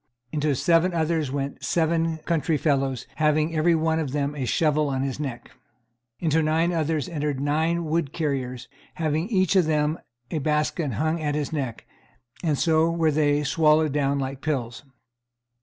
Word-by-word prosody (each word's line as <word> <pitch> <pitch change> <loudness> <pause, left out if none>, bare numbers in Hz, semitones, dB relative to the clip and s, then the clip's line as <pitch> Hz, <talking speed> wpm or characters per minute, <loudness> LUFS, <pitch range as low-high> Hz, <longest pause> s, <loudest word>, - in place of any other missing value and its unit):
Into 150 -2 0
seven 170 +4 +2
others 160 -3 0
went 140 0 -4
seven 165 -1 +1
country 165 -2 +1
fellows, 135 -4 0
having 155 +1 +2
every 165 +2 +3
one 160 0 +1
of 145 -5 -3
them 145 0 -1
a 140 -3 -3
shovel 150 +3 +1
on 135 -1 -1
his 135 0 -3
neck. 135 -5 -5 0.7
Into 160 -1 +2
nine 160 +3 +1
others 160 -1 0
entered 150 -5 -2
nine 160 +4 0
wood 155 -2 -1
carriers, 130 -6 -3 0.3
having 160 +2 -1
each 190 -4 +2
of 185 -3 +5
them 155 0 +1 0.3
a 160 - -1
basket 150 -1 0
hung 160 +8 -1
at 145 -1 -1
his 150 0 -2
neck, 130 -7 -4 0.6
and 155 -4 +1
so 160 +1 +3
were 165 -2 +1
they 145 -1 +2
swallowed 155 +1 +3
down 140 -1 +1
like 135 0 -4
pills. 125 -7 -2
155 Hz, 160 wpm, -25 LUFS, 140-160 Hz, 0.7 s, of